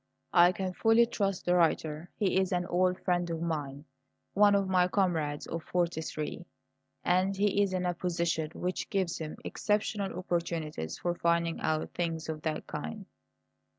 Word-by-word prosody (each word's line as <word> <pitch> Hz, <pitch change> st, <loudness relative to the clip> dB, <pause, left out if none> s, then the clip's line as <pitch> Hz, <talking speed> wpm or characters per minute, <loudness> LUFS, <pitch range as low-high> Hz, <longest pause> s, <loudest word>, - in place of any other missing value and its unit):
"I 175 Hz, 0 st, +7 dB
can 190 Hz, -1 st, -3 dB
fully 225 Hz, +4 st, +5 dB
trust 195 Hz, -5 st, -2 dB
the 180 Hz, -, +3 dB
writer. 160 Hz, -1 st, +1 dB
He 190 Hz, -2 st, +2 dB
is 190 Hz, 0 st, 0 dB
an 180 Hz, -1 st, 0 dB
old 180 Hz, +1 st, +1 dB
friend 175 Hz, -1 st, +1 dB
of 165 Hz, -1 st, -2 dB
mine 150 Hz, -4 st, -3 dB, 0.5 s
one 205 Hz, 0 st, +5 dB
of 200 Hz, -1 st, +2 dB
my 180 Hz, -1 st, +3 dB
comrades 165 Hz, -7 st, 0 dB
of 165 Hz, -, -4 dB
'43, 170 Hz, -2 st, -2 dB, 0.6 s
and 185 Hz, +2 st, +2 dB
he 205 Hz, 0 st, +2 dB
is 200 Hz, -2 st, +2 dB
in 185 Hz, -1 st, -1 dB
a 175 Hz, -, +1 dB
position 170 Hz, -3 st, -1 dB
which 180 Hz, +1 st, -3 dB
gives 190 Hz, -4 st, -1 dB
him 155 Hz, -1 st, -5 dB
exceptional 205 Hz, -3 st, -1 dB
opportunities 165 Hz, -, -3 dB
for 175 Hz, -, -1 dB
finding 170 Hz, -1 st, +1 dB
out 155 Hz, 0 st, -1 dB
things 165 Hz, -2 st, -2 dB
of 155 Hz, -1 st, -4 dB
that 155 Hz, -1 st, -2 dB
kind." 195 Hz, +7 st, -6 dB
175 Hz, 160 wpm, -30 LUFS, 160-190 Hz, 0.6 s, I